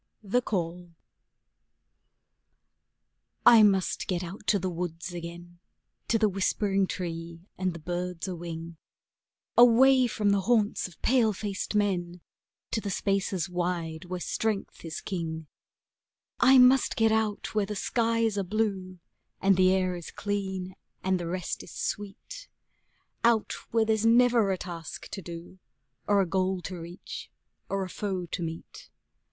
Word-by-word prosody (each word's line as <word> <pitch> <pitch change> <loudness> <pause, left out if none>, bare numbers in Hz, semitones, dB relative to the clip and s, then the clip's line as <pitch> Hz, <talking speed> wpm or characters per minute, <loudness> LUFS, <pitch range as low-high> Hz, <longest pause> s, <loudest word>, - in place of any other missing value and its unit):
THE 215 +5 +1
CALL 175 -5 -3 2.5
I 230 -2 +9
must 195 -3 +2
get 180 -1 -1
out 195 +4 -8
to 205 - +4
the 190 -1 -2
woods 175 0 -4
again, 175 0 -8 0.5
to 230 - +3
the 215 -1 +3
whispering 195 0 +1
tree, 170 -2 -5
and 185 -1 -1
the - - -7
birds 175 +2 -4
a 185 - -3
wing, 165 -1 -7 0.8
Away 250 +2 +7
from 210 -3 +1
the 200 -1 +2
haunts 215 -1 +1
of 175 - -17
pale 235 -4 +3
faced 200 +1 -4
men, 180 -4 0 0.5
to 220 - 0
the 205 - -4
spaces 195 -2 0
wide 175 -2 -3
where 180 0 -4
strength 215 +2 -2
is 165 -2 -5
king; 160 -4 -4 0.9
I 260 +2 +7
must 255 +1 +6
get 225 -1 +3
out 220 -2 0
where 210 -2 +1
the 210 - -4
skies 230 0 +1
are - - 0
blue 190 -2 -2 0.4
and 195 0 +4
the 185 0 +5
air 185 -1 +1
is 175 -2 -7
clean 190 -2 -3 0.3
and 190 -1 +1
the 170 - -4
rest 180 +1 -3
is - - -12
sweet, 205 - -5 0.8
Out 230 -2 +3 0.2
where 225 -1 +2
there's 220 -1 +1
never 235 -2 +5
a 190 - 0
task 170 -3 -7
to 195 - -6
do 175 +1 -9 0.5
or 205 -1 +4
a - - +2
goal 185 +1 0
to 180 +1 -6
reach 170 +3 -8 0.4
or 195 0 -1
a - - -4
foe 190 -2 -3
to 175 +2 -5
meet. 165 -1 -7
190 Hz, 145 wpm, -28 LUFS, 175-215 Hz, 2.5 s, I